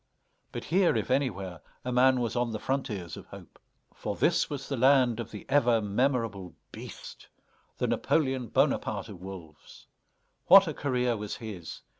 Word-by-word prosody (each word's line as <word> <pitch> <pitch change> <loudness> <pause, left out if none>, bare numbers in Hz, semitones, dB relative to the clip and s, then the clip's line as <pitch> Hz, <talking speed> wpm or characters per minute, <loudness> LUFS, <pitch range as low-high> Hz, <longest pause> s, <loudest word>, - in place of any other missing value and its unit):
But - - -5
here, 175 -3 +2
if 110 +3 -1
anywhere, 100 - -1 0.2
a 125 - -2
man 130 +1 +4
was 115 -1 -2
on 120 -1 0
the 110 - -4
frontiers 105 - -3
of - - -11
hope. - - -13 0.3
For - - -4
this - - +2
was 140 -2 -5
the 140 - -2
land 130 -2 +4
of 115 -1 -5
the 105 - -9
ever 120 -4 +3
memorable 105 - -1 0.2
BEAST, - - -10 0.5
the - - 0
Napoléon 130 -6 0
Bonaparte - - +1
of 95 -4 -10
wolves. 90 -5 -11 0.6
What 195 +1 +9
a 160 - -2
career 125 -4 0
was 105 -1 -5
his! 100 -8 -8
120 Hz, 160 wpm, -28 LUFS, 100-135 Hz, 0.6 s, What